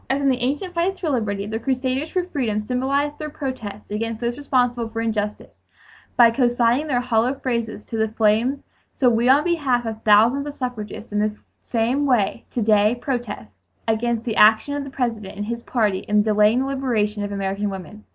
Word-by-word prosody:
"As 270 - +1
in 280 -1 +2
the 255 -1 +1
ancient 290 +9 -2
fights 360 +3 0
for 320 -5 -1
liberty, 205 -6 -1
the 220 +2 -3
crusaders 260 +4 -1
for 365 +1 0
freedom 255 - -2
symbolized 275 +4 -1
their 305 -1 -4
protest 240 -9 -6
against 225 +1 -3
those 240 0 -2
responsible 245 -4 0
for 225 0 -5
injustice 210 -2 -3 0.6
by 235 -1 +7
consigning 240 +3 +2
their 250 -4 +1
hollow 240 +2 +1
phrases 235 -5 -3
to 225 - -5
the 220 0 +2
flames, 220 +5 +1 0.3
so 250 -3 +3
we, 235 +2 +2
on 280 +3 +6
behalf 280 -8 +1
of 220 -1 -5
thousands 230 +7 +4
of 290 - -6
suffragists, 230 -4 -6
in 210 - 0
this 210 0 0 0.2
same 245 +5 0
way 235 -7 +1
to 240 - -2
day 210 +2 +3
protest 240 - -4 0.4
against 225 +1 0
the 225 -3 -2
action 220 +6 +5
of 285 0 -2
the 275 - -7
President 230 -7 -3
and 205 - -3
his 235 +2 -4
party 215 -6 0
in 210 +1 +1
delaying 215 +3 +3
the - - -1
liberation 230 -7 -1
of 205 - -4
American 200 +1 -2
women." 195 +2 -8
235 Hz, 190 wpm, -22 LUFS, 215-265 Hz, 0.6 s, by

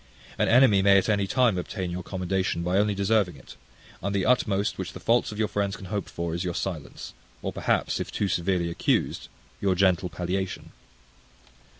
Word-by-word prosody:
An - - +3
enemy 120 -5 +6
may 100 0 +6
at 95 - +1
any 100 -2 +1
time 120 -5 +2
obtain 90 0 -4
your 90 +1 -4
commendation 95 -1 -2
by 90 +3 +1
only 105 0 +1
deserving 100 -1 +1
it; - - -14 0.5
and 100 +2 -2
the 95 - +1
utmost 105 -6 +1
which 95 - -4
the - - -8
faults 120 0 +2
of 105 - -8
your 110 -1 +1
friends 100 -1 -1
can 100 - -10
hope 100 -3 -2
for, 85 -1 -4
is 85 +2 -2
your 90 -2 -3
silence; 85 -7 -5 0.3
or, - - -3
perhaps, - - 0
if - - -4
too 105 - -1
severely 85 -1 0
accused, - - 0 0.3
your 95 -2 +2
gentle 90 -2 +2
palliation. 90 +2 -4
95 Hz, 190 wpm, -26 LUFS, 90-100 Hz, 0.5 s, enemy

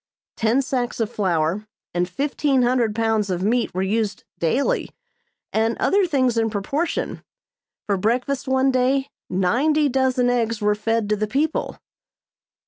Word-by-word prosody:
Ten 235 +4 +2
sacks 250 -3 -2
of 225 0 -1
flour, 185 0 0 0.3
and 175 +1 0
fifteen 275 +4 +1
hundred 240 -3 +1
pounds 220 -2 +1
of 180 0 -1
meat 235 +3 +1
were 185 - 0
used 210 +1 -1 0.2
daily, 270 - +1 0.6
and 225 +1 +1
other 395 -1 +2
things 255 -6 +2
in 225 0 +1
proportion. 275 - -2 0.6
For 200 -2 0
breakfast 250 +7 -1
one 265 +1 +3
day 265 +2 +1 0.2
ninety 275 +12 +2
dozen 260 -1 +2
eggs 230 -2 0
were 210 -1 +2
fed 225 +1 -1
to 210 - +3
the 215 +1 -2
people. 290 +8 -1
230 Hz, 140 wpm, -22 LUFS, 210-265 Hz, 0.6 s, one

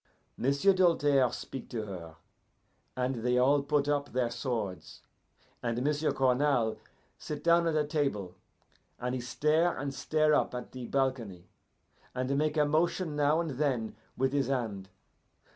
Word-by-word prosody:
"M'sieu' 140 +10 +3
Doltaire 145 -8 +3
speak 130 +1 -7
to 110 -3 -4
her, 85 -5 -8 0.8
and 130 0 -1
they 125 0 +2
all 140 +3 +4
put 145 0 0
up 145 -1 0
their 125 -2 0
swords, 115 -6 -4 0.6
and 120 +1 -1
M'sieu' 150 +2 +1
Cournal 130 -3 +2 0.4
sit 150 - -6
down 170 0 +4
at 160 - 0
a 150 -1 +2
table, 140 - -1 0.7
and 125 +1 -2
he 130 - -2
stare 155 +7 +1
and 140 0 -3
stare 155 +2 +1
up 145 - +1
at 125 - -6
the 125 -2 -7
balcony, 125 -10 -2 0.7
and 130 +2 -1
make 155 +2 0
a 150 - +4
motion 160 +2 0
now 150 +2 +3
and 165 -3 -2
then 125 -6 -1 0.2
with 130 +1 +1
his 140 -3 +1
hand. 110 -8 -3
135 Hz, 150 wpm, -30 LUFS, 125-150 Hz, 0.8 s, all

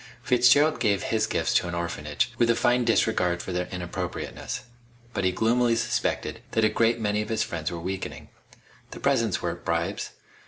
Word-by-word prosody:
Fitzgerald 125 +4 +4
gave 100 -5 +1
his 110 -1 0
gifts - - 0
to - - +2
an 85 - -3
orphanage, 85 +3 -2
with 120 -1 +4
a 115 - +4
fine 125 +1 +2
disregard 90 -6 +1
of 95 - -3
their 90 0 -1
inappropriateness. 90 -1 -5 0.5
But 100 - -1
he 95 - +3
gloomily 115 +4 +2
suspected 115 - -1
that 110 -1 +3
a - - +4
great 115 +2 +2
many 105 -1 0
of 105 - -5
his 110 0 +1
friends 85 -8 -3
were 85 - -5
weakening. 95 +3 -5 0.6
The - - -9
presents - - +1
weren't - - -3
bribes. - - -1
110 Hz, 180 wpm, -26 LUFS, 90-115 Hz, 0.6 s, Fitzgerald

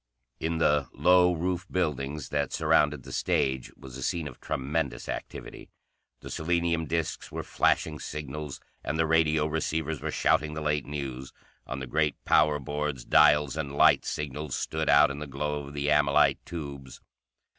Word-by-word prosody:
In 80 +1 -1
the 75 -3 +2
low 90 +4 +5
roof 90 +2 -2
buildings 75 -4 -2
that 70 -2 -1
surrounded 75 -3 +2
the - - -10
stage 65 -2 0
was 65 -2 -11
a - - -8
scene 80 +3 -1
of 65 - -11
tremendous 70 +2 -2
activity. - - -7 0.5
The - - -9
selenium 85 0 0
discs 85 0 -3
were - - -4
flashing 75 -1 +1
signals, 75 -1 -6 0.2
and 80 - -2
the 80 - +2
radio 80 -1 +3
receivers 80 -1 -2
were 80 - -3
shouting 75 0 +1
the 80 - -4
late 75 -2 -1
news; 65 -3 -5 0.3
on 65 - -4
the - - -3
great 75 +3 +1
power 75 -1 +4
boards 75 -2 -3
dials 75 0 +5
and 70 -3 -4
light - - +5
signals 75 -1 -4
stood 80 0 -2
out 70 0 +6
in 70 - -6
the 75 - -6
glow 75 +1 -3
of 70 - -10
the 70 0 -1
amylite 75 -1 +3
tubes. 70 -6 -7
75 Hz, 165 wpm, -28 LUFS, 70-80 Hz, 0.5 s, out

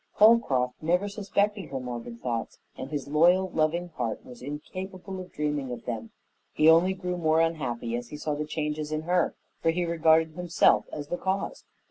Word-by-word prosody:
Holcroft 145 - +4
never 180 +5 +1
suspected 205 0 -1
her 135 - -3
morbid 120 -2 -6
thoughts, 115 -2 -3 0.2
and 130 - -6
his 145 -3 -4
loyal, 175 +6 +4
loving 165 +3 0
heart 120 -9 -4
was 125 -1 -12
incapable 185 +7 -6
of 180 -1 -9
dreaming 150 -3 -2
of 120 - -7
them. 115 -2 -4 0.4
He 155 - +4
only 170 +4 +6
grew 180 -1 -3
more 160 -1 +2
unhappy 130 -8 -1
as 120 0 -4
he 150 - -7
saw 150 0 -2
the 150 +1 -2
changes 150 0 -3
in 155 0 -2
her, 175 0 +1 0.3
for 165 - +2
he 175 +2 +1
regarded 160 -1 +3
himself 175 -1 +3
as 145 -1 -6
the 175 - -1
cause. 190 - -2
155 Hz, 180 wpm, -27 LUFS, 135-180 Hz, 0.4 s, only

